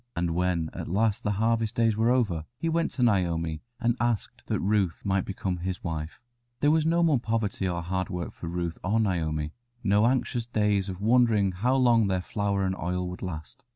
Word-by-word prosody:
And 85 0 0
when 85 -2 0
at - - -5
last 105 +4 +1
the 105 - 0
harvest 110 +1 +1
days 115 -2 +3
were 110 +2 +2
over, 105 -11 +1
he 165 - -2
went 165 +1 +1
to 125 - 0
Naomi 85 -7 +1 0.2
and 120 -1 +1
asked 120 -3 -2
that - - 0
Ruth 100 -4 0
might 95 -1 +1
become 95 -2 -3
his 90 +1 -4
wife. 80 -2 -4 0.4
There 145 - +4
was 160 0 +3
no 170 +1 +3
more 155 -6 +4
poverty 110 -4 -1
or 85 -1 -2
hard 95 +1 -2
work 90 -1 -3
now - - -20
for 85 - -5
Ruth 85 -1 -3
or 105 +5 +1
Naomi, 80 -7 -1 0.3
no 105 +2 +4
anxious 120 -2 0
days 105 -4 +1
of 95 0 -6
wondering 110 -3 +4
how 120 +9 +1
long 120 -5 +4
their 95 -1 +1
flour 100 -1 -1
and 95 0 0
oil 90 +1 -2
would 90 - -8
last. 80 -3 -7
100 Hz, 205 wpm, -27 LUFS, 90-115 Hz, 0.4 s, There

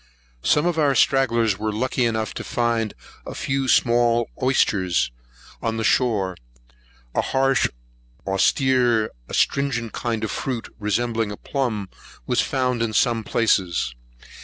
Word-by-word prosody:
Some 150 - +2
of 175 -2 0
our 145 -3 +3
stragglers 115 -7 +2
were 110 0 -1
lucky 125 +3 0
enough 110 -1 -1
to - - -5
find 115 -2 -1 0.3
a - - -8
few 135 0 -1
small 120 -1 +3
oysters 95 - +2 0.5
on 115 0 -1
the 115 - -2
shore. 105 -6 +1 0.8
A - - +2
harsh, 135 0 +2 0.6
austere, 120 +3 +2 0.2
astringent 130 -5 0
kind 115 -2 -2
of 110 - -2
fruit, 125 -4 -4
resembling 110 +1 -1
a 105 - -6
plumb, 115 -8 -2 0.4
was - - +2
found 125 -2 -1
in 115 -1 -1
some 115 +1 +2
places. 95 - +1
115 Hz, 130 wpm, -23 LUFS, 110-130 Hz, 0.8 s, our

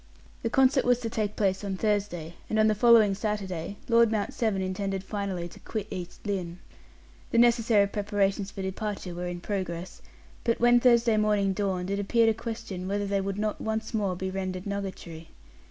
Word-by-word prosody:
The 230 - -1
concert 265 +2 +4
was 245 0 +4
to 225 -2 -3
take 215 -3 -2
place 195 -1 0
on 195 -2 -3
Thursday, 195 -6 -1 0.2
and 220 - 0
on 215 - +5
the 215 - +4
following 220 -1 +6
Saturday 195 -3 -3
Lord 235 -1 +5
Mount 210 -2 -1
Severn 220 -5 0
intended 190 0 -2
finally 195 -4 -3
to - - -14
quit 215 -3 -4
East 180 +2 -7
Lynne. 180 -4 -3 0.7
The - - 0
necessary 230 -3 +5
preparations 200 -1 -1
for 200 -2 -6
departure 190 -1 -4
were 175 +1 -4
in 175 0 -5
progress, 185 -3 -4 0.4
but 230 -1 +1
when 240 0 +6
Thursday 235 -2 +4
morning 210 -2 +2
dawned, 190 -2 -2
it 200 - -1
appeared 225 +3 +3
a - - +3
question 220 -5 -6
whether 205 +1 -1
they 200 0 0
would 195 0 -3
not 210 0 -2
once 220 +1 -3
more 200 -4 0
be 190 +1 -4
rendered 185 -1 -4
nugatory. 190 -5 -6
200 Hz, 185 wpm, -28 LUFS, 190-220 Hz, 0.7 s, following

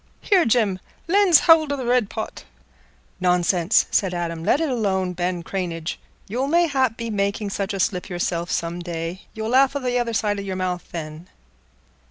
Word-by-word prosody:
Here, 380 -5 +3
Jim, 215 -5 +2 0.3
lend's 370 -3 +5
hould 320 -3 +5
o' 285 - -1
th' 255 -3 -4
red 245 -4 +2
pot." - - -6 0.8
"Nonsense!" 180 +1 +3
said 185 -3 +1
Adam. 170 -1 -3
"Let 275 - +3
it 325 - 0
alone, 195 -8 0
Ben 175 0 -2
Cranage. 170 -3 -4 0.3
You'll 250 +6 -2
mayhap 280 -7 +2
be 230 -1 -4
making 200 0 -1
such 195 +1 -2
a 195 - -4
slip 180 0 -1
yourself 175 -1 -2
some 170 +1 -2
day; 170 +1 -5
you'll 220 0 -3
laugh 265 +2 +4
o' - - 0
th' 250 -2 -2
other 235 -1 -2
side 210 -2 0
o' - - -3
your 195 -1 -4
mouth 180 -1 -3
then." 160 +1 -7
200 Hz, 180 wpm, -22 LUFS, 175-250 Hz, 0.8 s, lend's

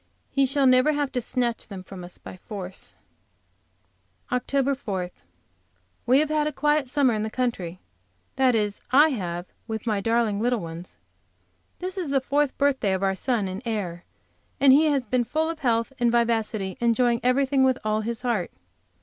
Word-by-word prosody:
He 275 -1 +2
shall 275 +1 +2
never 255 +4 +5
have 290 -2 -1
to 250 - -1
snatch 240 -1 -2
them 195 -3 -8
from 185 -1 -10
us 175 - -8
by - - -11
force. 185 - -8 1.4
OCT. 275 +2 +1
4. 190 -8 -4 1.0
We 255 +2 +5
have 305 +1 +2
had 305 -1 +1
a - - -1
quiet 295 0 +1
summer 255 -1 +3
in 215 - -1
the 220 - -2
country, 205 -8 -3 0.6
that 260 -2 +3
is, 210 -2 -1
I 290 +4 +6
have 175 - -3 0.2
with 220 -1 -4
my 210 -3 0
darling 225 -2 +1
little 245 +2 +1
ones. 170 0 -8 0.8
This 370 +1 -4
is 340 -6 -3
the 275 0 +3
fourth 285 +1 0
birthday 265 -8 +2
of 190 +1 -1
our 195 0 +2
son 215 0 -1
and 185 +1 -5
heir, 195 -7 -3 0.6
and 270 -1 +7
he 300 +4 +5
has 280 -4 +1
been 245 +2 +1
full 315 +7 -1
of 325 - -9
health 230 -1 0
and 240 -1 +3
vivacity, 225 -3 0
enjoying 235 0 +2
everything 265 +2 +2
with 260 -1 +3
all 215 0 0
his 230 +2 -4
heart. 230 -8 0
240 Hz, 175 wpm, -25 LUFS, 205-275 Hz, 1.4 s, and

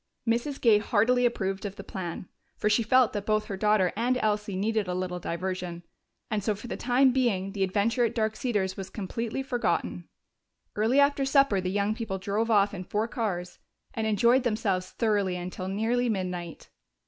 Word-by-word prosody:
Mrs. 240 +5 0
Gay 220 -4 +5
heartily 240 +4 +3
approved 195 -4 -3
of 200 -2 -5
the - - -8
plan, 180 -1 -6 0.3
for 210 - +1
she 210 - +4
felt 250 +2 +4
that 205 -1 -2
both 215 0 +1
her 200 - -4
daughter 210 -2 +2
and 245 +4 +1
Elsie 210 -3 -1
needed 215 +1 0
a 180 - -2
little 180 -1 -3
diversion, 175 0 -4 0.5
and 210 -2 -1
so 215 0 0
for 205 - -11
the 240 - -4
time 255 +2 +3
being 220 -7 0
the 195 -1 -1
adventure 210 +6 +1
at 230 - 0
Dark 220 -1 0
Cedars 200 -7 -1
was 190 -1 -6
completely 230 +5 -4
forgotten. 245 -3 -1 0.7
Early 225 +6 +3
after 280 0 +3
supper 270 -7 +3
the 185 - -2
young 200 +2 0
people 220 -4 -4
drove 205 +4 -1
off 205 -2 +3
in 185 -2 -5
four 210 +5 -1
cars 180 -7 -3 0.3
and 220 -1 -1
enjoyed 235 +5 +4
themselves 205 -6 -1
thoroughly 205 -5 0
until 180 +1 -5
nearly 230 +5 0
midnight. 180 -5 -4
210 Hz, 185 wpm, -27 LUFS, 190-235 Hz, 0.7 s, Gay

